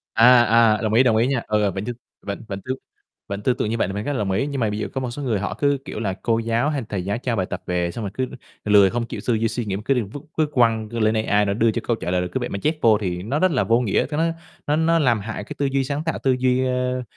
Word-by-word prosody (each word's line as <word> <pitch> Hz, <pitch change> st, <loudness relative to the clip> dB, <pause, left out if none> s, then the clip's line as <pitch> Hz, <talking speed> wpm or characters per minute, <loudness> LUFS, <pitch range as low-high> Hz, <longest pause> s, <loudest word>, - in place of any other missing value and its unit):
À, 120 Hz, +1 st, +7 dB
à, 115 Hz, -2 st, +4 dB
đồng 110 Hz, -1 st, -1 dB
ý, 120 Hz, +4 st, +6 dB
đồng 115 Hz, -3 st, +3 dB
ý 115 Hz, +3 st, +3 dB
nha, 135 Hz, -4 st, 0 dB
ờ, 105 Hz, -2 st, +1 dB
vẫn 95 Hz, +3 st, -5 dB
t -, -, -11 dB, 0.3 s
vẫn 100 Hz, +2 st, -6 dB
vẫn 100 Hz, -2 st, -5 dB
t -, -, -35 dB, 0.7 s
vẫn 100 Hz, 0 st, -4 dB
tư 125 Hz, -, +3 dB
tưởng 110 Hz, -, -2 dB
như 115 Hz, -, -1 dB
vậy -, -, +1 dB
thì 95 Hz, -, -4 dB
mình 105 Hz, -, -3 dB
rất 145 Hz, -, -1 dB
là 130 Hz, -, -2 dB
đồng 100 Hz, -2 st, -1 dB
ý. 115 Hz, +9 st, 0 dB
Nhưng 140 Hz, -2 st, -3 dB
mà 110 Hz, -, +2 dB
bây 105 Hz, +1 st, -3 dB
giờ 105 Hz, -, -2 dB
có 135 Hz, -, -2 dB
một 125 Hz, -, -3 dB
số 145 Hz, -, -6 dB
người 120 Hz, -7 st, 0 dB
họ 100 Hz, -, -3 dB
cứ, 140 Hz, -1 st, +2 dB
kiểu -, -, -6 dB
là, 100 Hz, -4 st, -1 dB
cô 115 Hz, -1 st, +1 dB
giáo 115 Hz, +5 st, 0 dB
hay 145 Hz, -3 st, -1 dB
thầy 95 Hz, -3 st, -3 dB
giáo 100 Hz, +3 st, -1 dB
cho 125 Hz, -1 st, -2 dB
bài 95 Hz, -3 st, 0 dB
tập -, -, -4 dB
về, 90 Hz, -1 st, 0 dB
xong 115 Hz, +4 st, -6 dB
rồi 100 Hz, -, -4 dB
cứ 130 Hz, +2 st, -2 dB, 0.4 s
lười 100 Hz, -2 st, +6 dB
không 120 Hz, +2 st, -2 dB
chịu -, -, -6 dB
tư 120 Hz, -, +3 dB
duy, 115 Hz, 0 st, +1 dB
suy 120 Hz, +1 st, -3 dB
nghĩ 100 Hz, -2 st, -2 dB
cứ 135 Hz, -, +3 dB
đem 120 Hz, -6 st, -1 dB
vứt 140 Hz, +6 st, -8 dB, 0.2 s
vứt 155 Hz, -2 st, +2 dB
quăng 115 Hz, -3 st, +2 dB
lên 110 Hz, -1 st, +1 dB
AI 105 Hz, 0 st, +3 dB
nó 100 Hz, -, 0 dB
đưa 115 Hz, +2 st, +2 dB
cho -, -, -3 dB
câu 120 Hz, -, +2 dB
trả 90 Hz, -, -4 dB
lời, 90 Hz, 0 st, +1 dB
rồi 90 Hz, -, -3 dB
cứ -, -, 0 dB
vậy -, -, -3 dB
mà 100 Hz, -, -4 dB
chép 155 Hz, +2 st, +2 dB
vô 110 Hz, -2 st, +5 dB
thì 90 Hz, -2 st, -3 dB
nó 130 Hz, +9 st, -1 dB
rất 185 Hz, +1 st, +3 dB
là 130 Hz, -, +2 dB
vô 115 Hz, +1 st, +3 dB
nghĩa, 115 Hz, -6 st, +1 dB
ta 150 Hz, +2 st, -4 dB
nói 165 Hz, +1 st, +1 dB, 0.3 s
nó 145 Hz, -, +2 dB
nó 165 Hz, +1 st, +3 dB
làm 120 Hz, -7 st, +3 dB
hại 105 Hz, 0 st, -5 dB
cái -, -, -8 dB
tư 145 Hz, -, +1 dB
duy 135 Hz, 0 st, +1 dB
sáng 140 Hz, +3 st, -3 dB
tạo, 160 Hz, -, -1 dB
tư 135 Hz, -, +3 dB
duy, 130 Hz, 0 st, +2 dB
ơ 125 Hz, 0 st, -1 dB
115 Hz, 330 wpm, -22 LUFS, 105-130 Hz, 0.7 s, À